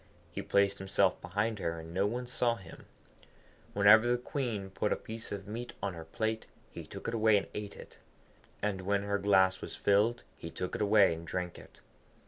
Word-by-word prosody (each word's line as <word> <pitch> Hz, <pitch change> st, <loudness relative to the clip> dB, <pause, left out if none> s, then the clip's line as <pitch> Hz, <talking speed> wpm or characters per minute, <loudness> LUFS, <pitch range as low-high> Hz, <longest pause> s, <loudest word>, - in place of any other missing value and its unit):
He -, -, -4 dB
placed 100 Hz, 0 st, +2 dB
himself 95 Hz, 0 st, +1 dB
behind 105 Hz, +4 st, -1 dB
her, 85 Hz, -2 st, -2 dB
and 80 Hz, +1 st, -9 dB
no 95 Hz, +3 st, +2 dB
one 125 Hz, +4 st, -3 dB
saw 120 Hz, -1 st, +1 dB
him. 95 Hz, -7 st, -13 dB, 0.9 s
Whenever 110 Hz, +3 st, +7 dB
the 120 Hz, 0 st, +3 dB
Queen 120 Hz, -6 st, -3 dB
put 105 Hz, -, -1 dB
a -, -, +3 dB
piece 110 Hz, 0 st, -8 dB
of 100 Hz, -1 st, -5 dB
meat 120 Hz, +3 st, -5 dB
on 95 Hz, -, -2 dB
her 80 Hz, -1 st, -8 dB
plate, 110 Hz, +6 st, -2 dB, 0.2 s
he -, -, -7 dB
took -, -, -8 dB
it 115 Hz, -, -2 dB
away 110 Hz, -2 st, +4 dB
and 100 Hz, -, -1 dB
ate 105 Hz, -1 st, -5 dB
it, -, -, -13 dB, 0.6 s
and 100 Hz, -3 st, 0 dB
when 100 Hz, +1 st, 0 dB
her 100 Hz, 0 st, 0 dB
glass 95 Hz, -2 st, +4 dB
was -, -, -6 dB
filled 105 Hz, +4 st, +2 dB
he 85 Hz, -, -8 dB
took 90 Hz, +2 st, -4 dB
it -, -, -3 dB
away 105 Hz, -3 st, +5 dB
and 80 Hz, 0 st, -8 dB
drank 90 Hz, -1 st, -3 dB
it. -, -, -16 dB
100 Hz, 200 wpm, -32 LUFS, 95-110 Hz, 0.9 s, Whenever